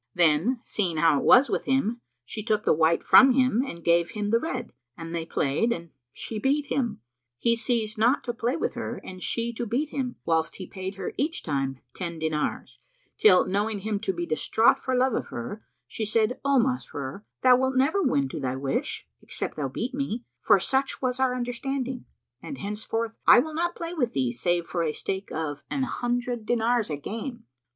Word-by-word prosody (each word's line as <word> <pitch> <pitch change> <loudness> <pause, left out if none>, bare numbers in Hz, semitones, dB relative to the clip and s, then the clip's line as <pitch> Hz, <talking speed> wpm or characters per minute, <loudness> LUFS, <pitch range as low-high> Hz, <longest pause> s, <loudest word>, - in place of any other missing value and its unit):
Then, 175 - +3
seeing 180 -6 -1
how 155 -2 +4
it - - -4
was 260 +2 +7
with - - -2
him, 245 -3 0 0.2
she 215 - -5
took 215 -1 0
the - - +4
white 160 +1 +2
from 265 0 +8
him 255 -2 +3
and 170 -11 -7
gave 170 0 +3
him 210 -1 -3
the 230 - +4
red, 255 -6 -4 0.2
and 165 0 -7
they 165 -1 -3
played 150 +14 +1
and 170 -5 -4 0.2
she 215 - -6
beat 280 +5 +1
him. 235 - -1 0.4
He 230 - +2
ceased 230 -2 -1
not 240 +6 +3
to 240 - -3
play 235 +3 -1
with - - -1
her - - -5
and 185 -1 -9
she 235 +4 -1
to 235 +1 -3
beat 270 +8 -1
him, 260 -4 -3
whilst 160 -1 +1
he 185 - -7
paid 190 0 -6
her 190 -1 -5
each 315 +5 -1
time 135 -3 -2
ten 170 -3 -5
dinars, 160 -1 -2 0.4
till, 185 -4 +6
knowing 205 +2 -1
him 210 0 -2
to 200 -2 -1
be 175 -2 -3
distraught 170 +8 +3
for 260 - -1
love 255 0 +2
of - - -2
her, 160 - -6 0.2
she 220 - -5
said, 220 +3 +1
"O 280 0 +3
Masrur, 205 - -2 0.2
thou 255 -1 +8
wilt 260 +1 0
never 290 +10 +3
win 140 - +2
to - - -5
thy 130 -2 -2
wish, 135 0 -3
except - - -5
thou 145 -3 -2
beat 230 - -4
me, 255 -4 -3 0.2
for 195 - +5
such 265 +8 0
was 255 0 0
our 260 -1 +2
understanding; 250 +1 -3 0.4
and 280 - -7
henceforth, 220 +2 -3
I - - +9
will 310 +6 +1
not 345 +2 -1
play 335 0 -5
with 250 -9 -1
thee 130 -3 +1
save 170 +8 0
for 175 - -2
a 155 -2 0
stake 190 +4 -4
of 150 -2 -3
an 275 - -1
hundred 245 -2 -2
dinars 235 -2 +1
a 150 - -2
game." 230 - -6
225 Hz, 200 wpm, -26 LUFS, 170-255 Hz, 0.4 s, I